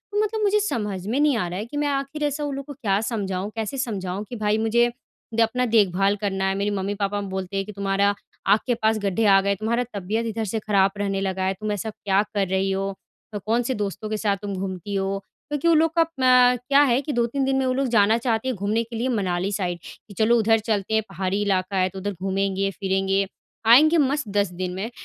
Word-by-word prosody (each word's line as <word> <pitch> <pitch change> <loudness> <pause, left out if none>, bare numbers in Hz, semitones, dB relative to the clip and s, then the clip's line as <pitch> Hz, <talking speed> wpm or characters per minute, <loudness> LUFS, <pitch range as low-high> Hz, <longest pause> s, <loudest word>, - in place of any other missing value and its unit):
मतलब 430 +1 0
मुझे 420 0 +3
समझ 210 - -2
में 245 +6 0
नहीं 295 -2 +3
आ 180 - -1
रहा 180 +3 -4
है 215 - -4
कि 290 +5 -7
मैं 295 0 +1
आखिर 275 +2 -2
ऐसा 295 0 -1
उन 285 -2 -2
लोग 275 0 -6
को 290 - -8
क्या 205 -8 0
समझाऊँ 200 -4 -2
कैसे 225 +4 -3
समझाऊँ, 200 -6 -3
कि 245 - -6
भाई 215 -1 +1
मुझे 235 +2 +2 0.4
द 230 - +3
अपना 250 +3 +2
देखभाल 200 -3 +3
करना 195 -2 -1
है, 195 - -1
मेरी 200 +1 0
मम्मी-पापा 200 +1 -2
बोलते 190 -1 -4
हैं 195 - -1
कि 210 - -8
तुम्हारा 200 0 +1 0.3
आँख 205 +2 +5
के 245 - +3
पास 220 0 +1
गड्ढे 205 +2 0
आ 195 -1 +6
गए 200 - -1
हैं, 200 - +1
तुम्हारा 235 +4 0
तबियत 205 +4 -2
इधर 225 0 -2
से 220 +2 -2
ख़राब 195 -2 +2
रहने 195 -1 -1
लगा 190 -1 -2
है। 190 +1 +1
तुम 215 0 -2
ऐसा 205 +1 -3
क्या 200 -2 +1
कर 200 -2 +1
रही 190 +1 0
हो? 195 +1 -1 0.4
अ, 205 - -2
कौन-से 235 +3 +1
दोस्तों 205 +2 -5
के 215 - -1
साथ 205 -2 0
तुम 200 -1 -4
घूमती 190 +1 -4
हो 195 0 -1 0.3
क्योंकि 295 +2 -1
उन 335 -1 +5
लोग 325 +1 +2
का 330 - +6
म 250 -1 +5
क्या 280 +1 +6
है 255 -3 +3
कि 290 +1 -4
2-3 240 +3 0
दिन 270 0 +1
में 265 0 +1
वो 255 - +1
लोग 270 0 0
जाना 215 +2 +5
चाहती 235 +1 -1
हैं। 260 - 0
घूमने 210 +3 0
के 230 0 -9
लिए 235 +3 -1
मनाली 190 -4 -1
साइड, 180 -4 -2 0.3
कि 205 - -12
चलो 220 +3 +3
उधर 225 0 +3
चलते 215 -1 -2
हैं 220 - +3
पहाड़ी 195 +2 -2
इलाका 195 -1 0
है 185 0 +2
तो 190 - -8
उधर 205 +2 -3
घूमेंगे-फ़िरेंगे, 195 0 0 0.4
आएँगे 305 +8 +7
मस्त 285 -3 +1
10 200 -2 +2
दिन 180 0 -4
में। 200 +4 -3
210 Hz, 235 wpm, -23 LUFS, 195-240 Hz, 0.4 s, आएँगे